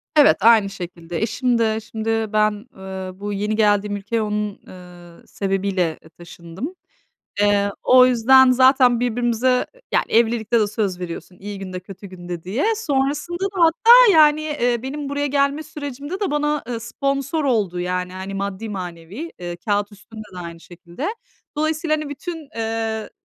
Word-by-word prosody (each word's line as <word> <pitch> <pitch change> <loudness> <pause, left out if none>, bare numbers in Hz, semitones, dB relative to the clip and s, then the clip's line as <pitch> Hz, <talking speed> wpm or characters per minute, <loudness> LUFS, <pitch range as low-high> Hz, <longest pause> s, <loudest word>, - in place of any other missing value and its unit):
Evet, 295 -2 +6
aynı 220 -2 +5
şekilde. 175 -3 -7
Eşim 240 +2 0
de 220 -1 +1
şimdi 220 0 -5 0.2
ben, 215 0 +3 0.3
eee, 190 -1 -7
bu 205 0 -4
yeni 210 +2 -1
geldiğim 205 -1 +2
ülkeye 210 +3 -2
onun, 210 -1 -3
eee, 175 -2 -14
sebebiyle, 195 -4 -1
eee, 160 - -16
taşındım. 175 - -9 0.7
Eee, 205 -1 +3
o 255 0 +7
yüzden 255 +2 +6
zaten 255 -1 +5
birbirimize 245 +1 +1 0.3
yani, - - +3
evlilikte 230 0 +2
de 210 - +2
söz 200 -4 -2
veriyorsun 180 +1 -7
iyi 205 0 -7
günde, 185 -1 -6
kötü 195 +2 -11
günde 175 -2 -8
diye. 205 +10 -2
Sonrasında 295 +1 -1
da - - -1
hatta, 450 +8 +7
yani, 305 -1 +6
eee, 245 -6 -1
benim 280 +2 -5
buraya 285 +1 -1
gelme 280 +2 +1
sürecimde 290 +4 -7
de 400 - -1
bana, 295 0 0
eee, 240 -2 -3
sponsor 275 +5 -2
oldu, 205 -9 0
yani, 180 0 -2
hani, 190 +1 -6
maddi 200 +2 -4
manevi. 185 - -7
Eee, 175 -1 -6
kâğıt 205 +2 -1
üstünde 215 +2 -11
de - - -8
aynı 170 -1 -8
şekilde. 175 - -7 0.5
Dolayısıyla, 310 +1 0
hani, 305 -1 -5
bütün, 315 +1 -7
eee, 225 -1 -3
220 Hz, 155 wpm, -21 LUFS, 190-275 Hz, 0.7 s, o